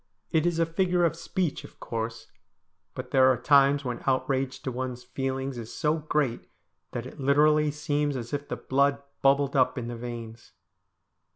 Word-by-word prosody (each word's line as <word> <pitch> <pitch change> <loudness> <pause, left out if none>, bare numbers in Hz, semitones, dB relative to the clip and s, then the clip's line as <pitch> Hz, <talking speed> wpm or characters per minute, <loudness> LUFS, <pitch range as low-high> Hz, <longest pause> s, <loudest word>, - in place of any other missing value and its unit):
It 160 0 +2
is 170 -2 0
a 165 - +3
figure 175 +1 +1
of 165 - +1
speech, 170 -1 -2
of - - -14
course, 115 -1 -4 0.7
but - - -6
there 130 -1 +6
are 125 - +1
times 140 +2 +4
when 120 -1 -3
outrage 130 0 0
to 130 - -2
one's 125 0 -4
feelings 135 0 -3
is 115 -1 -8
so 150 +1 0
great 150 -5 -1 0.4
that 120 - -4
it 130 - -10
literally 150 +2 +4
seems 145 -1 -1
as 120 +1 -7
if 145 0 -3
the - - -4
blood 140 +1 +1 0.2
bubbled 140 +1 +3
up 130 0 +3
in 120 -1 -4
the 120 - -4
veins. 115 -1 -8
135 Hz, 175 wpm, -27 LUFS, 125-150 Hz, 0.7 s, there